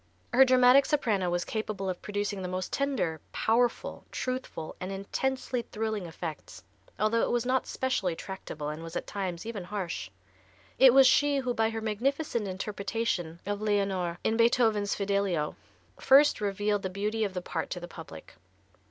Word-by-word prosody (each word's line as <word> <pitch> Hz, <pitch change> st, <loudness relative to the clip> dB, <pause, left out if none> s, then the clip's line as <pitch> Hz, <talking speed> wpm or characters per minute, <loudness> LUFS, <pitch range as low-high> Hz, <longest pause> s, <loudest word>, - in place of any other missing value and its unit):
Her 260 Hz, +2 st, +8 dB
dramatic 255 Hz, +1 st, +6 dB
soprano 215 Hz, -, +1 dB
was 175 Hz, 0 st, -1 dB
capable 215 Hz, -3 st, -3 dB
of 185 Hz, -1 st, -3 dB
producing 205 Hz, -1 st, -3 dB
the 185 Hz, -, -3 dB
most 185 Hz, 0 st, -4 dB
tender, 245 Hz, -, -1 dB
powerful, 235 Hz, +2 st, 0 dB
truthful 255 Hz, -11 st, -4 dB
and 185 Hz, +1 st, -4 dB
intensely 250 Hz, +6 st, -2 dB
thrilling 220 Hz, -4 st, -3 dB
effects, 160 Hz, -, -7 dB, 0.3 s
although 215 Hz, +2 st, +2 dB
it -, -, +1 dB
was 240 Hz, 0 st, 0 dB
not 255 Hz, +1 st, +1 dB
specially 210 Hz, -10 st, -1 dB
tractable 160 Hz, -5 st, -6 dB
and 155 Hz, +1 st, -5 dB
was 165 Hz, +1 st, -8 dB
at -, -, -2 dB
times 185 Hz, -3 st, -4 dB
even 220 Hz, -5 st, -5 dB
harsh. 180 Hz, -, -4 dB, 0.7 s
It 265 Hz, -1 st, +9 dB
was 270 Hz, -1 st, +8 dB
she 285 Hz, +2 st, +4 dB
who 255 Hz, -2 st, -1 dB
by 225 Hz, -1 st, +2 dB
her 225 Hz, 0 st, -4 dB
magnificent 235 Hz, +2 st, -1 dB
interpretation 195 Hz, -3 st, -3 dB
of 205 Hz, +1 st, -3 dB
Leonore, 195 Hz, -5 st, 0 dB
in 220 Hz, -, +1 dB
Beethoven's 225 Hz, -3 st, +3 dB
"Fidelio," 200 Hz, -6 st, 0 dB, 0.4 s
first 280 Hz, -1 st, +5 dB
revealed 205 Hz, 0 st, 0 dB
the 190 Hz, -, -3 dB
beauty 210 Hz, +4 st, -1 dB
of 195 Hz, -3 st, -2 dB
the 180 Hz, -, -2 dB
part 165 Hz, -2 st, -3 dB
to 180 Hz, -, -4 dB
the 175 Hz, -, -8 dB
public. 160 Hz, -, -11 dB
205 Hz, 160 wpm, -29 LUFS, 185-240 Hz, 0.7 s, It